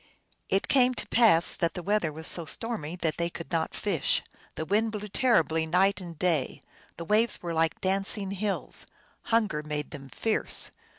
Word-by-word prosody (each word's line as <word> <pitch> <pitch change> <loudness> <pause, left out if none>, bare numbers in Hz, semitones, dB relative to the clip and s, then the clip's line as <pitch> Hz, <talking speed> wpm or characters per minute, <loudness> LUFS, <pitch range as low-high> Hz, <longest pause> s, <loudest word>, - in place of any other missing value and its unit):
It 195 - +1
came 255 -2 +4
to - - -3
pass 215 -8 +5
that 170 - -1
the 180 - -5
weather 200 -4 +1
was 160 +2 -8
so 170 - +3
stormy 180 -6 -3
that 160 -2 0
they 170 0 -1
could 170 0 -9
not 165 -2 -1
fish. 195 -8 0 0.3
The 160 - -4
wind 215 +5 +1
blew 210 -1 -5
terribly 165 - +2
night 190 +4 +2
and 170 -3 -9
day; 160 -6 -1 0.3
the 170 - -6
waves 215 +3 +2
were 170 -1 -3
like 160 0 0
dancing 195 +1 +1
hills. 200 0 -2 0.4
Hunger 215 -9 +1
made 150 -1 -5
them 140 -3 -9
fierce. 225 +8 0
180 Hz, 175 wpm, -28 LUFS, 160-210 Hz, 0.4 s, pass